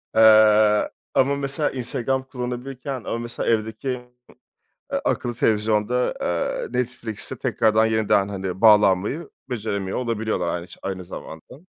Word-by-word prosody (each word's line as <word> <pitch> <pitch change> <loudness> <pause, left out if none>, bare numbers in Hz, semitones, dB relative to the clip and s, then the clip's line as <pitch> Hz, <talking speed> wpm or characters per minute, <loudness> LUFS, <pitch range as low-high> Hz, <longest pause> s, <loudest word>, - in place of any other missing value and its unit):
Eee, 110 -1 +6 0.3
ama, 140 +1 +3
mesela, 140 +2 -1
Instagram 130 +1 -1
kullanabilirken, 130 +1 -5
ama 115 - -3
mesela 120 0 -3
evdeki, 110 +3 -1 1.0
eee, - - 0
akıllı 120 - 0
televizyonda, 110 +3 +1
eee, 85 -1 -1
Netflix'e 120 -3 -4
tekrardan, 110 0 +2
yeniden, 110 -3 +2
hani, 95 -1 -5
bağlanmayı 105 - +4 0.2
beceremiyor 100 -5 -3
olabiliyorlar, 110 -6 -1
aynı 85 +1 -6
ç - - -13
aynı 95 -1 -4
zamanda, 85 - -10
110 Hz, 120 wpm, -23 LUFS, 105-125 Hz, 1.0 s, Eee